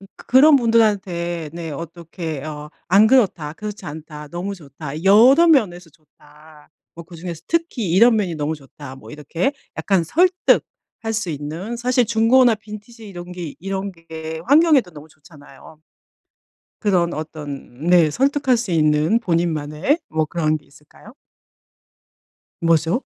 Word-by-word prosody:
그 - - -16
그런 280 +4 +6
분들한테 190 - 0
네 165 -2 -6
어떻게 165 -1 -7
어 150 -1 -7 0.2
"안 200 +5 +5
그렇다. 190 - +2
그렇지 210 +1 -8
않다. 150 0 -9
너무 175 +5 -5
좋다. 150 -1 -9
여러 255 - +6
면에서 180 - +2
좋다. 150 0 -21 0.2
뭐 170 - -10
그중에서 170 -1 -8
특히 325 - -1
이런 225 +6 +5
면이 185 -6 -1
너무 150 +1 -2
좋다." 135 -1 -12
뭐 - - -14
이렇게 165 - -3 0.2
약간 190 -4 +1
설득할 345 - 0
수 210 -6 -2
있는 160 +10 -6
사실 245 0 +1
중고나 235 +2 +4
빈티지 215 +1 -11
이런 175 -1 -9
게 175 -5 -7
이런 195 +2 -4
게 160 -1 -8
환경에도 290 - +4
너무 150 0 -12
좋잖아요. 150 0 -17 1.0
그런 180 -5 +1
어떤 150 -2 -7
네 175 -3 +5
설득할 270 - +1
수 225 -6 -4
있는 155 +6 +2
본인만의 170 - -1
뭐 155 0 0
그런 155 -1 -1
게 150 - -21
있을까요? 150 - -18 1.5
뭐죠? 165 - +2
175 Hz, 280 characters per minute, -20 LUFS, 155-220 Hz, 1.5 s, 그런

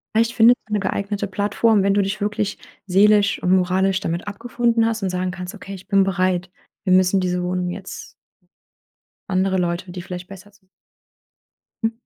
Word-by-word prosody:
Vielleicht 230 +1 +2
findet 240 +1 +6
man 210 - 0
'n 205 - 0
geeignete 200 +1 -2
Plattform, 205 +2 +1
wenn 200 0 +3
du 205 - +3
dich 195 +2 -2
wirklich 205 0 -2 0.3
seelisch 200 +2 +4
und 180 +1 +3
moralisch 190 +1 +1
damit 170 0 -3
abgefunden 230 +2 0
hast 225 -2 -1
und 190 - 0
sagen 180 0 -2
kannst: 180 +1 -7
„Okay, 195 - -9
ich 185 -1 -11
bin 195 -2 +4
bereit. 185 -2 0 0.3
Wir 190 - 0
müssen 185 +1 +4
diese 180 0 -1
Wohnung 180 0 -1
jetzt” 190 +1 -8 1.2
Andere 190 0 +1
Leute, 175 0 -2
die 180 0 -6
vielleicht 180 0 -7
besser 195 +1 -12
zu 200 -1 -28 1.2
Hm. 225 - +2
195 Hz, 175 wpm, -21 LUFS, 185-205 Hz, 1.2 s, findet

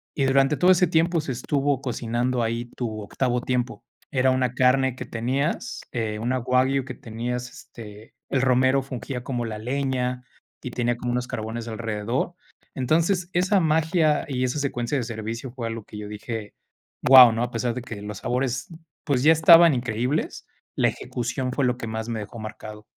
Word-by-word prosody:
Y 140 - 0
durante 135 +2 +3
todo 180 +1 +5
ese 180 -1 +4
tiempo 165 0 +2
se 135 - -4
estuvo 140 +2 0
cocinando 120 0 -1
ahí 115 +1 -2
tu 110 -3 -4
octavo 125 +4 -1
tiempo. 125 -4 -2 0.3
Era 130 -1 +3
una 130 -1 0
carne 130 0 +3
que - - -7
tenías, 130 +7 -2
eh, 110 -3 -2
una 125 +3 0
Wagyu 130 +2 +1
que 125 - -6
tenías, 120 +2 -5
este, 110 0 -12
el 135 - +1
romero 130 +1 +3
fungía 130 -1 -6
como 125 -2 -3
la 110 -2 -5
leña 125 0 -2 0.4
y 125 - -5
tenía 120 0 0
como 120 0 -3
unos 125 0 -1
carbones 115 +1 -5
alrededor. 115 +6 -2 0.4
Entonces, 170 +7 +1
esa 185 +3 +3
magia 160 -1 +2
y 130 -2 -1
esa 130 +4 -1
secuencia 135 -1 -1
de 130 - -1
servicio 115 +2 -5
fue 120 -2 -6
algo 115 -1 -5
que 105 - -10
yo 105 0 -6
dije: 105 0 -6 0.5
“Guau”, 125 -3 +10
¿no? 115 - -2
A 120 - -2
pesar 120 -2 -1
de 125 - -4
que 115 -4 -8
los 105 -1 -6
sabores, 125 0 -2 0.4
pues, 135 -5 +1
ya 155 - +7
estaban 165 0 +7
increíbles, 125 +3 -2 0.3
la - - +3
ejecución 125 +1 -3
fue 135 -1 +1
lo 125 - +1
que 115 - -6
más 110 0 -4
me 115 - -2
dejó 105 +3 -8
marcado. 110 0 -8
125 Hz, 180 wpm, -24 LUFS, 115-135 Hz, 0.5 s, Guau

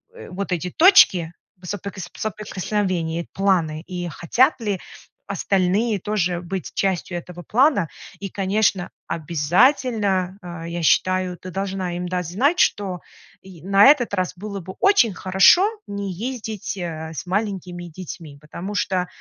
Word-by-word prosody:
э, 470 - -11
вот 195 +1 -4
эти 180 +1 -3
точки 195 - +6 0.3
соприкос 190 -1 -6
соприкосновения, 185 -5 -2
планы, 170 -6 +1
и 175 -1 -5
хотят 235 +11 +2
ли 205 -4 -1 0.5
остальные 200 +3 +1
тоже 180 -3 -1
быть 185 +1 -5
частью 185 -2 -1
этого 175 0 -9
плана. 250 - +3 0.3
И 195 - -5
конечно, 195 -1 0 0.2
обязательно, 185 - +1
а, 170 -2 -7
я 170 0 -4
считаю, 185 +2 +2
ты 185 - -9
должна 190 -2 -3
им 180 0 -3
дать 180 -1 -2
знать, 275 - +1
что 190 -3 +1 0.4
й 185 -4 -14
на 195 +3 +5
этот 270 -6 +5
раз 185 -2 -1
было 200 +1 -6
бы 185 +1 -9
очень 380 - +4
хорошо 190 - +5 0.2
не 200 -1 -4
ездить, 220 -1 -5
э, 160 -3 -5
с 160 - -6
маленькими 185 -2 -3
детьми, 165 -3 -9
потому 175 +6 -7
что 185 -3 0
185 Hz, 135 wpm, -22 LUFS, 175-205 Hz, 0.5 s, точки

